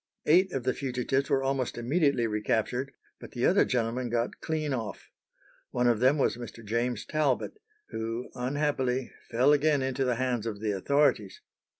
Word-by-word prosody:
Eight 180 +5 +4
of 135 -5 -3
the 130 +1 +1
fugitives 135 +1 -1
were 135 - +2
almost 135 -3 -1
immediately 140 0 +1
recaptured, 115 +4 -1 0.3
but - - -11
the 120 0 0
other 190 - +5
gentlemen 120 0 -1
got 120 +1 -2
clean 155 -3 -2
off. 115 -5 -5 0.6
One 125 - 0
of 120 -3 +3
them 130 +5 +4
was 135 - +1
Mr. 115 -2 -9
James 115 +1 -1
Talbot, 155 - 0 0.3
who, 115 +2 -4
unhappily, 130 -1 -1 0.2
fell 130 +5 +4
again 145 -1 +2
into 130 0 -1
the 125 -2 +1
hands 120 -2 -1
of 105 -3 -4
the 105 0 -1
authorities. 110 -1 +1
125 Hz, 165 wpm, -28 LUFS, 115-140 Hz, 0.6 s, other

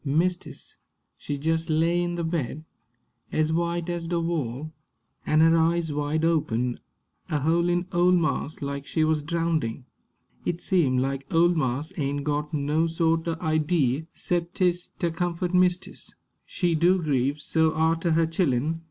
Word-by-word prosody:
Mistis, 170 +5 -2 0.4
she 145 - -5
jes' 160 +3 -1
lay 165 +3 +2
in 175 0 -2
the 170 - -2
bed, 160 -2 -3 0.7
ez 155 0 +1
white 170 0 -1
ez 170 -1 -3
de 170 0 0
wall, 155 -3 -3 0.5
an' 155 +1 +4
her 165 +1 +6
eyes 165 -1 +1
wide 150 +2 0
open, 125 -7 0 0.5
a 150 - 0
hole'in' 170 +3 +1
ole 175 +1 +3
marse 155 -3 0
like 140 0 -4
she 160 - +1
wuz 155 0 +2
drowndin'. 155 -6 -1 0.6
It 170 - -2
seem 160 -11 +2
like 135 +1 -2
ole 170 +1 +5
marse 145 -1 -2
ain' 145 -1 -1
got 150 0 -2
no 150 +2 +1
sort 165 0 0
o' 165 -1 -1
idee, 155 -3 +1
'cep 175 -1 -2
'tis 180 -1 +1
ter 170 - -1
comfort 175 +1 -2
mistis. 180 0 0 0.3
She 175 -2 0
do 175 +4 +3
grieve 140 -2 0
so 160 +1 +2
arter 165 +1 +1
her 165 +1 +3
chillen. 160 -2 0
160 Hz, 150 wpm, -26 LUFS, 145-170 Hz, 0.7 s, her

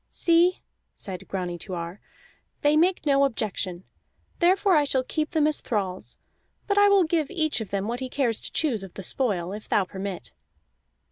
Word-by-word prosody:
"See," 345 +2 +3 0.4
said 190 -3 -7
Grani 180 -2 -4
to 185 0 -6
Ar, 170 +3 -6 0.6
"they 295 +1 +4
make 350 +2 +2
no 280 -1 +4
objection; 200 -8 -2 0.6
therefore 370 +2 +4
I 300 - +5
shall 265 -2 0
keep 310 +4 -2
them 315 -3 +2
as 305 0 +1
thralls. 190 -5 -3 0.5
But 405 -1 +2
I 410 0 +6
will 400 -2 +5
give 320 -2 0
each 315 -9 0
of 215 - -6
them 200 0 -2
what 240 +2 -2
he 260 -1 -4
cares 245 -5 0
to - - -5
choose 260 -10 0
of 195 -2 -10
the 195 - -7
spoil, 190 -5 -1
if 210 +1 -8
thou 200 - +3
permit." 190 - -6
255 Hz, 185 wpm, -26 LUFS, 195-315 Hz, 0.6 s, I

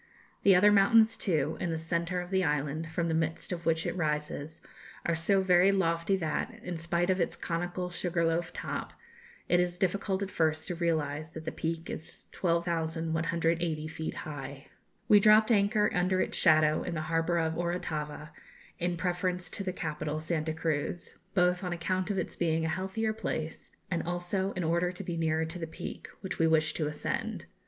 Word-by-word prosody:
The 195 -2 +6
other 205 +3 +6
mountains 220 +3 +6
too, 160 -6 0
in 175 - -1
the 165 - -1
centre 170 +2 -1
of 180 +1 -9
the 190 -1 +2
island, 150 +1 -1
from 170 +1 -1
the 165 - 0
midst 165 +2 -1
of 170 -2 -4
which 165 0 +2
it - - -2
rises, 150 -2 -2 0.5
are 170 - +2
so 190 +4 +3
very 185 +1 +5
lofty 170 -1 +1
that, 160 -5 -2
in 175 -2 -4
spite 170 +2 +1
of 185 -1 +1
its 170 - 0
conical 175 +1 -3
sugar 175 -1 0
loaf 165 +1 0
top, - - -5 0.5
it 175 - +4
is 180 0 0
difficult 195 +1 0
at 195 - -5
first 155 -1 0
to - - -1
realise 155 -3 -1
that 160 0 -9
the - - -2
Peak 165 +1 -3
is 160 - -8
12,180 165 -1 0
feet 160 0 -5
high. 140 -1 -7 0.4
We 210 - +8
dropped 215 +2 +6
anchor 210 0 +3
under 185 +1 +2
its - - 0
shadow 155 -1 +5
in 175 - -3
the 155 - -1
harbour 165 +2 0
of 160 -1 +1
Orotava 160 -3 -3 0.5
in 175 0 -1
preference 180 0 -1
to 200 - -3
the 185 - -1
capital, 155 -3 -3
Santa 160 0 -1
Cruz, 160 +1 -2 0.2
both 180 0 +3
on 180 -1 -2
account 185 +3 -1
of 200 - -1
its - - -2
being 160 -1 +1
a - - 0
healthier 190 +6 -1
place, 160 -7 -4 0.2
and 170 - +1
also 175 +3 -2
in 185 - -2
order 170 +2 +1
to 185 +2 -7
be 175 -2 -3
nearer 160 -1 +1
to 165 +3 -6
the 165 - -4
Peak, 160 - -7
which 190 - -5
we 165 - +4
wished 155 -1 +3
to 155 - 0
ascend. 150 0 -3
170 Hz, 185 wpm, -30 LUFS, 160-180 Hz, 0.5 s, We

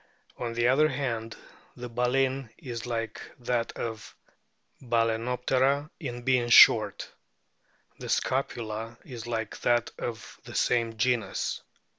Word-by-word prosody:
On 115 -1 -3
the 120 +1 +2
other 150 +4 +5
hand, 115 -5 -3 0.4
the 125 0 -7
baleen 130 +2 0
is 125 -6 -6
like 115 -2 -3 0.2
that 120 -1 -1
of 110 -2 -6 0.7
Balcenoptera 125 +4 +1
in 120 -6 -5
being 125 -2 +2
short. 110 -3 +7 0.9
The - - -7
scapula 115 -3 -2
is 120 -3 -8
like 115 -2 -3
that 120 -1 +1
of 115 -2 -6
the - - -10
same 115 -2 +1
genus. 115 -3 0
120 Hz, 115 wpm, -28 LUFS, 115-130 Hz, 0.9 s, short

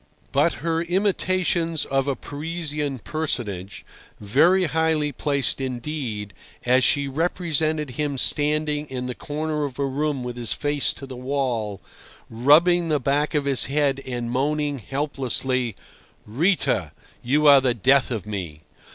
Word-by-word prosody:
But - - +3
her 165 0 +1
imitations 175 -3 0
of 135 0 0
a 140 - 0
Parisian 150 -2 -4
personage, 110 - -4 0.3
very 160 - +3
highly 160 -2 +1
placed 140 -1 0
indeed, 125 -5 -4 0.3
as 125 +1 +4
she 140 +1 +2
represented 155 -1 -1
him 145 +2 -2
standing 150 +2 0
in 125 -2 -4
the 125 - -3
corner 150 +3 -3
of 135 -3 -4
a 140 - 0
room 140 0 -1
with 125 0 -5
his 120 -2 -1
face 145 -1 0
to 135 - -9
the 130 -1 -8
wall, 125 -6 -2 0.5
rubbing 165 +9 +4
the 150 -2 +1
back 145 +4 0
of 145 -1 +1
his 140 -2 +4
head 140 -1 +1
and 120 -2 -3
moaning 145 +2 0
helplessly, 130 -2 -1 0.5
"Rita, 120 - 0 0.3
you 145 +5 +1
are 140 -2 +8
the 125 -2 +1
death 135 +4 +3
of 110 -7 -3
me!" 90 -8 -5
140 Hz, 140 wpm, -23 LUFS, 125-150 Hz, 0.5 s, are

